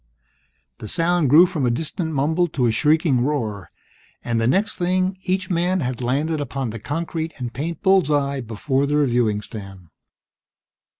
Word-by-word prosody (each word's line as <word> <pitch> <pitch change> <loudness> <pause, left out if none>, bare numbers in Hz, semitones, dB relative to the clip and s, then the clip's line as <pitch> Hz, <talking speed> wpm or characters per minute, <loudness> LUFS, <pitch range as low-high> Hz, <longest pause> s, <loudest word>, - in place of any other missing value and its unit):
The 110 - -7
sound 165 - +1
grew 160 +6 +8
from 160 -5 -3
a 125 - +3
distant 160 +6 -3
mumble 160 +5 +1
to 135 -6 -1
a 115 - +3
shrieking 150 +1 +2
roar, 110 - -2 0.5
and 115 -1 -1
the 115 - +2
next 195 - +1
thing, 185 +1 0
each 190 0 -2
man 180 +1 +1
had 130 -2 -3
landed 145 +5 0
upon 135 -3 -3
the 115 - -7
concrete 160 +5 -4
and 120 -3 -5
paint 155 +5 -5
bull's 190 -5 +4
eye 140 -2 0
before 130 +5 -1
the 150 +1 +1
reviewing 120 -7 +1
stand. 95 -5 -10
145 Hz, 165 wpm, -22 LUFS, 120-165 Hz, 0.5 s, grew